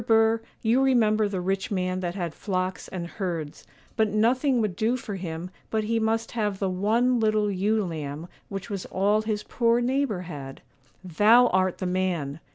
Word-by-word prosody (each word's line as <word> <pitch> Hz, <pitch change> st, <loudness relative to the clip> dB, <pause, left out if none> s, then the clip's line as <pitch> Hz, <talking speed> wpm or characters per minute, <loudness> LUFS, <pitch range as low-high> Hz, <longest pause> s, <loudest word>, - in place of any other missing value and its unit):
Burr, 225 Hz, 0 st, +4 dB, 0.2 s
you 235 Hz, +4 st, +3 dB
remember 220 Hz, -5 st, +3 dB
the 195 Hz, -2 st, -2 dB
rich 190 Hz, +1 st, -1 dB
man 185 Hz, -2 st, -1 dB
that 175 Hz, -1 st, -3 dB
had 175 Hz, -5 st, -3 dB
flocks 185 Hz, -2 st, -3 dB
and 180 Hz, -2 st, -5 dB
herds, 170 Hz, -5 st, -5 dB, 0.3 s
but 220 Hz, -1 st, +2 dB
nothing 245 Hz, +5 st, +2 dB
would 210 Hz, -5 st, -1 dB
do 230 Hz, +6 st, +1 dB
for 215 Hz, -4 st, -6 dB
him 175 Hz, -1 st, -5 dB, 0.2 s
but 220 Hz, -1 st, 0 dB
he 225 Hz, +1 st, 0 dB
must 225 Hz, +1 st, 0 dB
have 210 Hz, -4 st, -1 dB
the 195 Hz, -1 st, -1 dB
one 230 Hz, +7 st, +2 dB
little 215 Hz, -1 st, +2 dB
ewe 205 Hz, +2 st, +1 dB
lamb 155 Hz, -1 st, -5 dB, 0.2 s
which 195 Hz, -1 st, -5 dB
was 200 Hz, -4 st, -5 dB
all 205 Hz, +3 st, +2 dB
his 215 Hz, -1 st, -2 dB
poor 235 Hz, -1 st, +2 dB
neighbour 250 Hz, -5 st, 0 dB
had. 145 Hz, -6 st, -8 dB, 0.4 s
Thou 215 Hz, +8 st, +5 dB
art 185 Hz, -1 st, +1 dB
the 185 Hz, -, -4 dB
man! 180 Hz, -6 st, -1 dB
205 Hz, 175 wpm, -26 LUFS, 185-225 Hz, 0.4 s, Thou